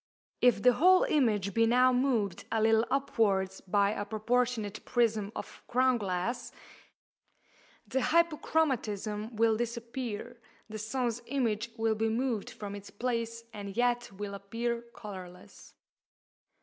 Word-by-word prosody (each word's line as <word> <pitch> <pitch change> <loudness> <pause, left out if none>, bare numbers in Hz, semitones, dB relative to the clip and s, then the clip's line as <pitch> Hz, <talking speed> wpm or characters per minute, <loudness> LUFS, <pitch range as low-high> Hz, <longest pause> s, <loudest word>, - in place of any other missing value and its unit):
If 235 -5 +4
the 250 0 +7
whole 365 +7 +5
image 210 -9 +1
be 230 0 +3
now 250 +2 +5
moved 245 -8 0
a 225 - +1
little 225 +1 +3
upwards 195 -8 +1
by 200 +1 +3
a 205 - -3
proportionate 220 0 -1
prism 220 -4 +1
of - - -8
crown 255 0 +3
glass, 195 +4 -2 1.4
the 265 - 0
hyperchromatism 250 - 0
will 225 0 +3
disappear, 235 0 -4 0.3
the 215 0 -7
sun's 240 +1 -2
image 235 -5 0
will 225 0 +2
be 225 +1 0
moved 230 -2 -1
from 205 -1 -7
its 205 0 -8
place, 230 0 -3
and 200 -1 -7
yet 240 -1 +1
will 200 +1 -6
appear 230 +4 -3
colourless. 185 -4 -10
230 Hz, 125 wpm, -30 LUFS, 205-245 Hz, 1.4 s, the